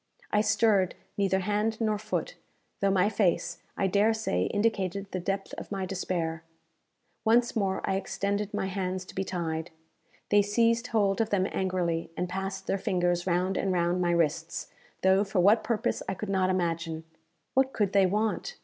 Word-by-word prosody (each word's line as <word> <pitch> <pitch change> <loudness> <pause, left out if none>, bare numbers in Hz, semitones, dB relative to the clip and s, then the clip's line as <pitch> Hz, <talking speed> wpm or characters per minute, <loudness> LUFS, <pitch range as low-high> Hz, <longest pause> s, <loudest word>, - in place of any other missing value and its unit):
I 210 - +4
stirred 210 -4 +3 0.2
neither 190 -1 +1
hand 210 +3 0
nor 215 -2 +1
foot, 215 - -3 0.4
though 200 - +2
my 190 0 +3
face, 185 -4 0 0.2
I - - +1
dare 205 +4 +3
say, 90 - 0
indicated 200 - 0
the 185 - -2
depth 195 +2 -3
of - - -10
my 195 -2 -2
despair. 175 -3 -2 0.8
Once 235 +2 +3
more 195 -3 0
I 195 - +1
extended 200 +1 -2
my - - -1
hands 185 -1 -3
to - - -12
be 195 - -1
tied. 165 -3 -3 0.6
They 205 0 +6
seized 230 +3 +2
hold 205 -2 +2
of 220 - 0
them 195 -3 +2
angrily, 180 -3 -1
and 180 - -1
passed 190 +1 -4
their 195 - 0
fingers 175 -3 0
round 185 +2 +1
and 195 - 0
round 175 0 +1
my 175 - +2
wrists, 165 -1 0 0.3
though 190 +1 +5
for 195 -1 -1
what 205 +5 +5
purpose 225 -2 -1
I 195 - -1
could 210 +2 -5
not 190 -1 +2
imagine. 170 -3 -1 0.5
What 265 0 +3
could 205 -5 0
they 195 -2 +5
want? 215 - -1
195 Hz, 175 wpm, -28 LUFS, 180-210 Hz, 0.8 s, They